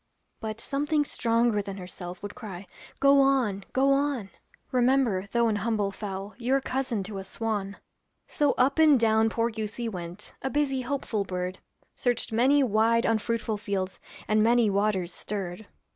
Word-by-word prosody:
But 220 0 -5
something 295 +3 0
stronger 230 -4 +1
than 195 0 -7
herself 180 -1 -8
Would 205 - -5
cry, 200 -4 -8 0.3
'Go 280 0 +6
on, 250 -8 +2
go 270 +1 +3
on!' 275 -8 -1 0.4
Remember, 250 -6 +2
though 235 -1 +3
an 215 -2 +1
humble 205 -1 0
fowl, 195 0 -6
You're 260 +3 +2
cousin 260 -5 -2
to 195 0 -6
a - - -6
swan.' 200 -1 -3 0.5
So 295 -6 +1
up 270 +5 +2
and 305 -4 +6
down 220 0 +3
poor 230 +1 0
goosey 220 +2 -4
went, 180 -1 -6
A 265 - -2
busy, 275 -2 0
hopeful 250 -5 -2
bird. 185 -1 -4 0.4
Searched 245 -1 0
many 265 +6 +4
wide 230 0 +3
unfruitful 225 0 0
fields, 195 -2 -3 0.3
And 215 0 +3
many 230 -1 +4
waters 195 -3 0
stirred. 195 0 -5
220 Hz, 155 wpm, -27 LUFS, 200-255 Hz, 0.5 s, Go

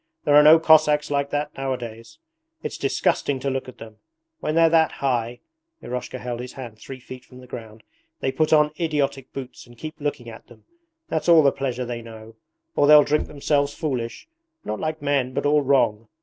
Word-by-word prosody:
There 145 - +2
are 145 - +9
no 155 +2 +8
Cossacks 155 -2 +4
like 140 0 0
that 145 +1 -3
nowadays. 120 - -6 0.5
It's - - -5
disgusting 140 -2 0
to 135 +1 -2
look 130 -1 -4
at 125 - -14
them. 110 -1 -12 0.4
When 155 - -2
they're 165 0 +6
that 160 -1 +3
high 120 -3 -2 0.4
[Eroshka 125 +1 -5
held 125 -1 -5
his 125 +1 -7
hand 120 -5 -9
three 135 -1 -9
feet 130 0 -11
from 125 - -16
the 130 - -13
ground] 110 -3 -10 0.4
they 130 - -1
put 155 +3 0
on 150 -1 +4
idiotic 145 -5 -1
boots 130 -2 -9
and 120 0 -17
keep 155 +5 -7
looking 145 -4 -3
at 115 - -11
them - - -19 0.4
that's 160 +2 -2
all 165 -2 +7
the 140 - +5
pleasure 130 -2 -3
they 120 -1 -5
know. 110 -1 -12 0.4
Or 145 - +3
they'll 150 0 +8
drink 150 +1 0
themselves 145 0 -1
foolish, 125 - -4 0.4
not 105 - -4
like 155 -1 -4
men 135 -3 0
but - - -1
all 150 +1 +4
wrong. 115 -6 +1
135 Hz, 195 wpm, -23 LUFS, 120-150 Hz, 0.5 s, are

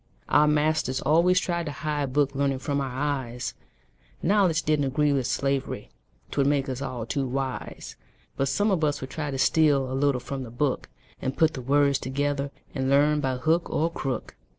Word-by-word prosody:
Our 150 +1 +5
masters 150 -3 +1
always 170 +5 +4
tried 170 -2 -2
to - - -2
hide 145 -2 -2
Book 140 -1 +2
learning 135 -1 0
from 140 +1 -1
our 135 - -2
eyes; 130 -2 -3 0.7
Knowledge 185 -4 +3
didn't 150 -2 +2
agree 145 +2 +2
with 130 -3 0
slavery 135 0 -2 0.4
'Twould 140 -1 +2
make 140 -1 +1
us 130 0 -4
all 125 -5 -4
too 135 +3 -1
wise. 130 0 -4 0.4
But 135 - 0
some 205 +11 +1
of 175 -4 +1
us 145 -1 +1
would 130 - -6
try 150 -2 -3
to 135 - -3
steal 140 -2 +3
A - - -2
little 135 -1 +2
from 135 +2 -5
the 125 - -7
book, 130 +3 -1 0.3
And 130 +1 -3
put 160 -1 +4
the 130 - -5
words 140 +1 +3
together, 140 +1 -1 0.2
And 130 0 -1
learn 145 +2 +4
by 130 -2 0
hook 160 +6 +1
or 165 +2 0
crook. 130 -7 -4
140 Hz, 190 wpm, -26 LUFS, 130-150 Hz, 0.7 s, Our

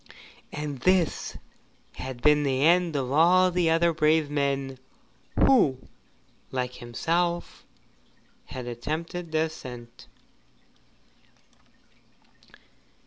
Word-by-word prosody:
And 150 -2 -5
this 180 +3 +1 0.6
had 130 -2 -7
been 150 0 +5
the 135 -1 0
end 170 0 +3
of 130 -2 -2
all 180 +5 +5
the 175 -2 +1
other 165 +1 +3
brave 155 -1 +2
men 140 -2 -1 0.7
who 200 - +4 0.7
like 125 -1 -3
himself 170 +9 -2 0.8
had 130 -1 -7
attempted 160 +8 -5
the 155 0 +1
ascent. 125 -7 -7
150 Hz, 85 wpm, -26 LUFS, 130-170 Hz, 0.8 s, been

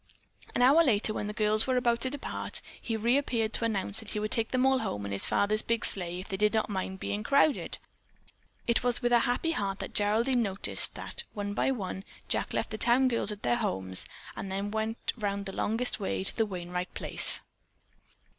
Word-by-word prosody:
An 245 - +3
hour 290 +6 +7
later, 220 -6 +2
when 210 - -3
the - - -3
girls 215 +1 +2
were 255 -1 +2
about 235 -1 +2
to 260 - +1
depart, 285 +1 -6 0.2
he 225 -2 -2
reappeared 235 -1 +1
to 230 - +2
announce 205 -1 0
that 220 -2 -3
he 210 - -3
would 215 0 -3
take 225 -1 +1
them 255 0 +2
all 265 0 +4
home 105 - -3
in 100 - -5
his 100 - +1
father's 215 +2 +2
big 230 -1 0
sleigh 175 -2 +1
if 185 - -8
they 195 - -3
did 210 +2 +2
not 220 -1 0
mind 190 0 -3
being 205 +3 -3
crowded. 280 +5 +2 0.9
It 235 -1 +2
was 245 +1 +2
with 240 - +2
a 240 - +6
happy 245 +8 0
heart 195 -9 -2
that - - -7
Geraldine 230 +5 +3
noticed 195 -3 +1
that 475 - -4
one 205 -1 -3
by 205 - +1
one 195 -6 -3 0.2
Jack - - 0
left - - -2
the 215 - -5
town 255 +2 +4
girls 230 -3 0
at 205 - -8
their 120 0 +2
homes, 95 0 -1 0.3
and 195 - -5
then 200 +2 -2
went 220 +1 -2
round 200 -2 -2
the 195 - -5
longest 230 +3 -1
way 195 -1 -2
to - - -3
the 225 -2 +1
Wainright 180 -1 -5
place. - - +1
215 Hz, 210 wpm, -29 LUFS, 200-240 Hz, 0.9 s, hour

